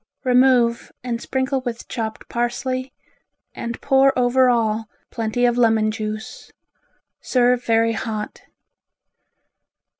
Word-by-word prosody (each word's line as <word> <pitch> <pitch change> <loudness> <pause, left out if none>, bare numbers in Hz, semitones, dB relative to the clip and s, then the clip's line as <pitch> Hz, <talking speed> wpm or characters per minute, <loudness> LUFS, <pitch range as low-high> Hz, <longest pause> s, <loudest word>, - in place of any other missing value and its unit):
Remove 250 -2 +3
and 240 -2 -3
sprinkle 265 0 -1
with 240 -2 -6
chopped 220 -3 -5
parsley 255 +2 -2 0.6
and 235 0 -5
pour 270 -1 +3
over 250 +1 +3
all 225 -2 0 0.2
plenty 230 +1 -1
of 240 0 +1
lemon 220 -2 +3
juice. 215 0 -6 0.7
Serve 250 -1 +2
very 230 0 +2
hot. 215 -2 -5
240 Hz, 100 wpm, -21 LUFS, 225-255 Hz, 0.7 s, Remove